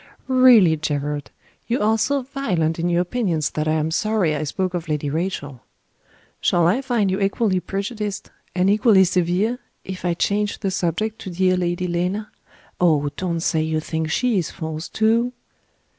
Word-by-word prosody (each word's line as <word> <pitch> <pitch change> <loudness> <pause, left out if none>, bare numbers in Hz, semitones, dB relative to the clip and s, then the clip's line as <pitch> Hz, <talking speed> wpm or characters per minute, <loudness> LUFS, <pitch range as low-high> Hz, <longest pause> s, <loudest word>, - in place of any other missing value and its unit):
"Really, 250 -11 +6
Gerard, 145 -1 -3 0.4
you 240 +2 0
are 215 +1 +3
so 280 +3 +1
violent 185 - -1
in 170 +1 0
your 175 0 +2
opinions 175 - -1
that 155 0 -2
I 155 - +2
am 155 0 0
sorry 195 -3 +1
I 150 - -2
spoke 185 +5 -2
of 170 -2 -4
Lady 150 -2 -1
Rachel. 145 -6 -3 0.8
Shall 175 -1 +2
I 200 +10 +2
find 235 -7 0
you 190 - -1
equally 195 -1 +1
prejudiced, 200 +2 -4 0.2
and 185 +1 +2
equally 205 -1 +5
severe, 185 +6 +1 0.2
if 190 -1 -7
I 175 -1 0
change 205 +3 -1
the 195 -2 -1
subject 185 +6 -1
to - - -7
dear 185 +1 +2
Lady 175 0 -1
Lena? 180 +5 -2 0.5
Oh, 150 -5 +3
don't 170 -3 -2
say 160 -1 +1
you 155 0 0
think 160 0 -3
She 235 +3 +1
is 165 - -3
false, 160 -1 -6
too!" 230 +3 +1
180 Hz, 170 wpm, -22 LUFS, 160-215 Hz, 0.8 s, Really